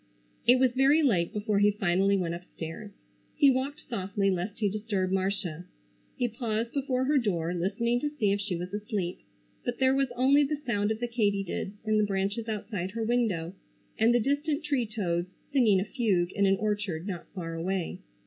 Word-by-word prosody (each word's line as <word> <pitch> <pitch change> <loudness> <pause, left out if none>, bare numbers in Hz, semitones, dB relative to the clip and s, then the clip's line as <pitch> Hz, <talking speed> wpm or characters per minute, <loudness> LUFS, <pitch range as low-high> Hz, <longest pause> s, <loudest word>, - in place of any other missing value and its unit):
It 245 - +8
was 255 -1 +4
very 275 +5 +4
late 185 - +2
before 210 -1 0
he 205 0 +5
finally 195 0 +2
went 170 -3 -1
upstairs. 170 +2 -7 0.5
He 285 -3 +6
walked 265 +3 -3
softly 200 -3 0
lest 185 +3 -3
he 210 - +1
disturb 200 -2 -1
Marcia. 190 -3 -1 0.5
He 245 - +1
paused 230 0 -3
before 260 -2 0
her 290 +1 +3
door 175 -7 -1
listening 235 +7 0
to 295 - -1
see 230 -9 0
if 200 0 0
she 200 -3 -2
was 180 +3 -5
asleep, 205 -4 -3 0.4
but 245 - -2
there 260 0 +4
was 270 -1 +1
only 270 +4 +5
the 295 +2 0
sound 205 -3 +1
of 220 0 -1
the 240 - 0
katydids 205 -4 -1
in 215 0 +2
the - - +4
branches 200 +3 -1
outside 205 -3 -3
her 230 0 -2
window, 220 -8 0 0.4
and 225 +2 +4
the 240 - +4
distant 285 +5 0
tree 280 -6 0
toads 180 -5 -2 0.2
singing 225 -8 +5
a 190 - -1
fugue 195 -8 +1
in 200 -1 +2
an 195 - +4
orchard 205 -5 -2
not 185 -4 -5
far 165 -3 -4
away. 175 +1 -2
210 Hz, 185 wpm, -29 LUFS, 190-245 Hz, 0.5 s, It